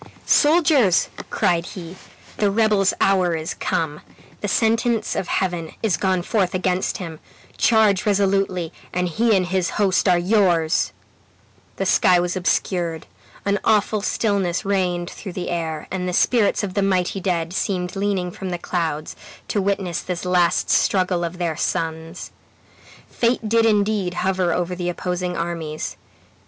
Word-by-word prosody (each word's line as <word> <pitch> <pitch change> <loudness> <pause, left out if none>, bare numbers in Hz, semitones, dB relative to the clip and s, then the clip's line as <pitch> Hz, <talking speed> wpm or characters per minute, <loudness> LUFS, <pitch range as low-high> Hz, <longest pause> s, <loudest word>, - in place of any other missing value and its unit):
"Soldiers!" 295 - +4 0.2
cried 170 -1 +1
he, 170 0 -8 0.4
"the 205 - +2
rebel's 210 -2 +3
hour 185 -3 +3
is 160 0 -4
come. 150 -2 -2 0.4
The 205 - -3
sentence 225 +1 +1
of 175 - -2
Heaven 175 -4 -2
is 210 -6 +2
gone 185 +1 0
forth 190 -3 0
against 185 0 0
him. 165 -4 -7 0.4
Charge 220 -4 +3
resolutely, 195 -4 +1 0.2
and 180 0 0
he 220 +6 +2
and 185 - +1
his 185 -1 0
host 200 -2 +2
are 180 - +5
yours!" 175 -4 +2 0.8
The - - -2
sky 180 -1 +4
was 175 +1 -1
obscured; 175 -2 -1 0.4
an 200 0 +1
awful 210 0 +2
stillness 200 -4 0
reigned 180 -3 0
through 190 - -8
the 180 - -4
air, 160 -3 -3
and 180 -1 -2
the - - -3
spirits 220 +2 +2
of 190 -2 -3
the 200 - 0
mighty 190 -1 0
dead 175 -3 -1
seemed 180 -1 -2
leaning 195 -3 -1
from 190 +1 -6
the 175 - -2
clouds, 160 -4 -3 0.3
to 205 - 0
witness 190 -3 -1
this 180 -1 -5
last 180 -2 +2
struggle 180 -2 +2
of 170 +1 -4
their 170 -3 -1
sons. 165 +2 -3 0.8
Fate 235 -1 0
did 230 +1 +3
indeed 205 -4 +1
hover 185 -1 0
over 180 0 -1
the 180 0 -3
opposing 180 0 -3
armies. 165 -2 -4
185 Hz, 145 wpm, -22 LUFS, 175-200 Hz, 0.8 s, are